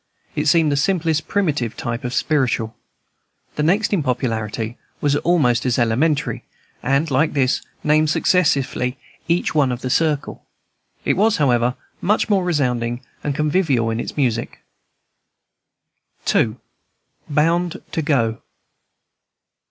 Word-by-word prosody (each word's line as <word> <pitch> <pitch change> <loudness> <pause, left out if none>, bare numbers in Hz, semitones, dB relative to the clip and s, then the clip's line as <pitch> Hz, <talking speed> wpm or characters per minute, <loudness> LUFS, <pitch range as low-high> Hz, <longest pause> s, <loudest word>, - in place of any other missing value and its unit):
It 150 +1 0
seemed 160 0 +4
the - - +2
simplest 165 -2 +1
primitive 150 - -1
type 120 -1 -4
of 125 - -3
"spiritual." 125 -6 0 0.8
The - - -1
next 195 +8 +2
in 190 - +2
popularity 115 -3 -2 0.2
was 145 -1 +1
almost 145 -10 +2
as 125 -3 +1
elementary, 130 +6 +1 0.4
and, 140 +4 +1
like 150 +5 +2
this, 135 -2 +1 0.2
named 155 +1 +3
successively 140 -7 +1 0.3
each 170 +1 +1
one 145 -4 +3
of 125 0 -4
the 130 - -3
circle. 150 -2 0 0.6
It - - +2
was, 215 +2 +3
however, 125 -3 +2 0.3
much 210 +3 +1
more 195 -3 +3
resounding 125 -8 0 0.2
and 145 -2 -1
convivial 150 -7 +1
in 110 - -2
its - - -5
music. 120 -5 -1 1.7
II. 110 -1 +2 0.7
BOUND 170 +4 +1
TO 165 - -1
GO. 125 -8 0
145 Hz, 125 wpm, -20 LUFS, 125-160 Hz, 1.7 s, seemed